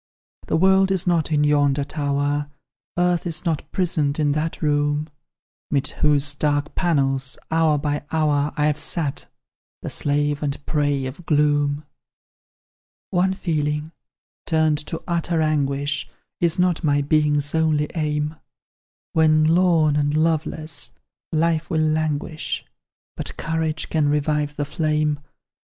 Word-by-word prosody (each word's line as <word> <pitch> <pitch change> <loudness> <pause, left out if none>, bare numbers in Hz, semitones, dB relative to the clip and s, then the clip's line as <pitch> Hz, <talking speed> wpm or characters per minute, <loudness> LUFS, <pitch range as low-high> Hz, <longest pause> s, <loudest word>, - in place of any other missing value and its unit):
"The - - +1
world 190 +2 +4
is 190 -2 0
not 170 -3 +1
in 150 -1 +3
yonder 145 -1 +3
tower, 145 0 -1 0.5
Earth 175 0 +1
is 170 +2 -2
not 160 -3 -2
prisoned 155 -6 0
in 150 -2 +2
that 155 +2 -2
room, 145 +1 +1 0.6
'Mid 140 -2 0
whose 145 -2 +3
dark 145 0 0
panels, 135 -6 +1
hour 160 -2 +3
by 145 0 -2
hour, 150 -2 +1
I've 150 0 +1
sat, 150 -6 -2 0.6
the - - -4
slave 145 0 +1
and 145 -1 -3
prey 145 -3 0
of 145 +7 -8
gloom. 145 -1 +2 1.3
"One 190 0 +2
feeling 150 -4 -2 0.6
turned 155 -2 +2
to 165 - -5
utter 170 -1 0
anguish, 145 -2 0 0.3
Is 170 -2 +2
not 180 -1 +1
my 145 -2 +2
being's 150 0 +1
only 155 -2 +2
aim; 150 -1 -1 0.8
When, 155 -1 +4
lorn 160 -2 +3
and 145 +1 +1
loveless, 155 -1 -1 0.4
life 165 0 +1
will 160 - 0
languish, 155 0 -1 0.5
But - - -6
courage 160 -1 -2
can 155 -2 +1
revive 150 0 0
the 145 - -2
flame. 150 -1 0
150 Hz, 125 wpm, -22 LUFS, 145-160 Hz, 1.3 s, world